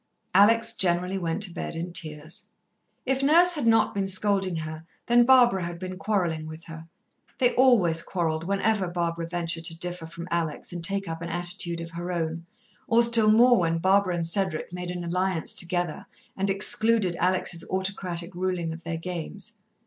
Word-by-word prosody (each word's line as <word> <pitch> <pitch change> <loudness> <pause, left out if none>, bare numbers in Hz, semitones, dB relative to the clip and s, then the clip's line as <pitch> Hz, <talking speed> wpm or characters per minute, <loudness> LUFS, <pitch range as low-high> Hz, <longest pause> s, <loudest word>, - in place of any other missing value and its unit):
Alex 230 +4 +4
generally 180 -1 0
went 170 +3 -2
to 180 -4 -3
bed - - -5
in 170 +1 -5
tears. 155 -1 -3 0.6
If 270 0 0
Nurse 340 +6 +6
had 295 -8 0
not 225 0 +3
been 195 -1 -2
scolding 195 -1 +1
her, 155 0 -6 0.2
then 240 0 +4
Barbara 245 -8 +5
had 170 0 -5
been 185 +1 -7
quarrelling 175 -8 -1
with 155 +1 -10
her. 165 0 -11 0.5
They 245 -1 +2
always 210 -11 +4
quarrelled 165 -2 -2
whenever 200 +1 0
Barbara 170 -1 -3
ventured 170 -1 -3
to 165 -1 -1
differ 175 -1 -3
from 170 +1 -9
Alex 170 -1 -3
and 175 -1 -6
take 195 +1 -1
up 165 0 -6
an 170 - -5
attitude 175 0 -2
of 165 0 -8
her 175 +2 -5
own, 165 -1 -4 0.4
or 230 +1 +4
still 230 -2 +5
more 240 +2 +5
when 165 -1 0
Barbara 190 +1 +2
and 170 -1 -2
Cedric 175 -1 0
made 180 0 -5
an 180 0 -5
alliance 180 0 0
together 175 -2 -2 0.3
and 195 +1 -1
excluded 210 -1 +3
Alex's 180 -1 +1
autocratic 185 -2 -2
ruling 175 -2 -3
of 165 +1 -11
their 165 0 -4
games. 170 -1 -6
180 Hz, 175 wpm, -25 LUFS, 170-200 Hz, 0.6 s, Nurse